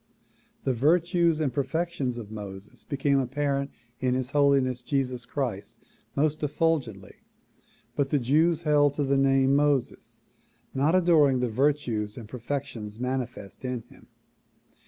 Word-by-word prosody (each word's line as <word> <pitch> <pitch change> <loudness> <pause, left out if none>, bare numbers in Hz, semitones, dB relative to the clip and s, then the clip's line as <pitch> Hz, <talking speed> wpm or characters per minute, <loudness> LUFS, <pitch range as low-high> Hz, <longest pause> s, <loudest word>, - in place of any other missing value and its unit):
The 130 - +1
virtues 165 +4 +2
and 145 -5 0
perfections 145 -3 -2
of 110 -3 -8
.Moses 100 -2 -9
became 140 -1 +1
apparent 140 +1 -1 0.3
in 125 -1 +1
His 130 0 -3
Holiness 135 -3 +3
Jesus 125 -2 -2
Christ 115 -8 -4 0.4
most 150 +2 +1
efful 155 +2 +1
gently 105 -6 -12 0.8
but 140 -1 0
the 145 - +2
Jews 155 +6 +2
held 145 -2 +3
to 145 - 0
the 140 0 +1
name 135 0 +3
Moses, 145 -3 0 0.5
not 145 +6 +2
adoring 155 -7 +4
the 125 -1 0
vir 140 +7 +3
tues 110 -7 -4
and 115 -3 -8
perfections 120 -3 -5
manifest 125 -5 -4
in 125 -2 -3
him. - - -18
135 Hz, 135 wpm, -27 LUFS, 125-145 Hz, 0.8 s, adoring